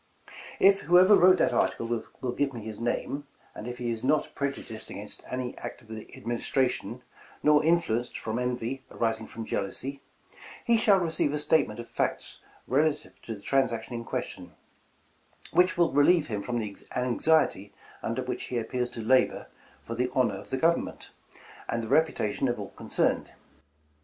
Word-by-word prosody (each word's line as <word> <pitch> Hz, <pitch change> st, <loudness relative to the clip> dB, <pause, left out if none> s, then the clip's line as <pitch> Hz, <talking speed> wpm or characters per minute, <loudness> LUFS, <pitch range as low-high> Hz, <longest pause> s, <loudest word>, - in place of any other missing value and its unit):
" -, -, -13 dB
' -, -, -14 dB
If 195 Hz, 0 st, +3 dB
whoever 180 Hz, +5 st, +6 dB
wrote 185 Hz, 0 st, +6 dB
that -, -, +2 dB
article -, -, +1 dB, 0.3 s
will 125 Hz, -, -2 dB
give 135 Hz, +2 st, -1 dB
me 115 Hz, -, -6 dB
his 110 Hz, -1 st, -7 dB
name, 140 Hz, +4 st, -2 dB, 0.3 s
and 110 Hz, -, -8 dB
if 125 Hz, 0 st, -5 dB
he 120 Hz, -1 st, -2 dB
is 115 Hz, -1 st, -4 dB
not 150 Hz, +3 st, +1 dB
prejudiced 135 Hz, -5 st, -4 dB
against -, -, -7 dB
any 125 Hz, -1 st, -3 dB
act -, -, -7 dB
of 110 Hz, -, -22 dB
the 110 Hz, -1 st, -8 dB
Ad -, -, -14 dB
ministration, 125 Hz, +2 st, -1 dB, 0.4 s
nor 150 Hz, 0 st, +5 dB
influenced 160 Hz, -8 st, +1 dB
from 110 Hz, +2 st, -3 dB
envy 125 Hz, +1 st, -2 dB
arising 115 Hz, -1 st, -1 dB
from 115 Hz, -1 st, -7 dB
jealousy, 135 Hz, +9 st, -3 dB, 0.6 s
he 235 Hz, -, +4 dB
shall 210 Hz, -3 st, +5 dB
receive 160 Hz, -4 st, 0 dB
a -, -, 0 dB
statement 145 Hz, -7 st, +2 dB
of 120 Hz, -, -7 dB
facts -, -, -2 dB, 0.3 s
relative 150 Hz, +3 st, 0 dB
to 115 Hz, -, -6 dB
the 100 Hz, -, -13 dB
transaction 120 Hz, -1 st, 0 dB
in 115 Hz, 0 st, -4 dB
question, -, -, -5 dB, 1.0 s
which 180 Hz, 0 st, +3 dB
will 170 Hz, -1 st, +3 dB
relieve 150 Hz, +3 st, +4 dB
him 105 Hz, -7 st, -3 dB
from 120 Hz, +4 st, -2 dB
the 105 Hz, -3 st, -4 dB, 0.2 s
anxiety 125 Hz, -4 st, +2 dB, 0.3 s
under 120 Hz, +3 st, -2 dB
which 125 Hz, -, -4 dB
he 125 Hz, -, -3 dB
appears 125 Hz, +2 st, -2 dB
to 115 Hz, -, -6 dB
labor 130 Hz, +4 st, +2 dB, 0.3 s
for 115 Hz, -, -6 dB
the 125 Hz, +2 st, 0 dB
honor 115 Hz, -7 st, +2 dB
of 100 Hz, -, -12 dB
the 130 Hz, -, -1 dB
Government, 165 Hz, +5 st, 0 dB, 0.6 s
and 115 Hz, 0 st, -1 dB
the -, -, -4 dB
reputation 135 Hz, -5 st, +1 dB
of 120 Hz, -2 st, -1 dB
all 100 Hz, -1 st, -6 dB
concerned. -, -, -1 dB
125 Hz, 175 wpm, -28 LUFS, 115-150 Hz, 1.0 s, whoever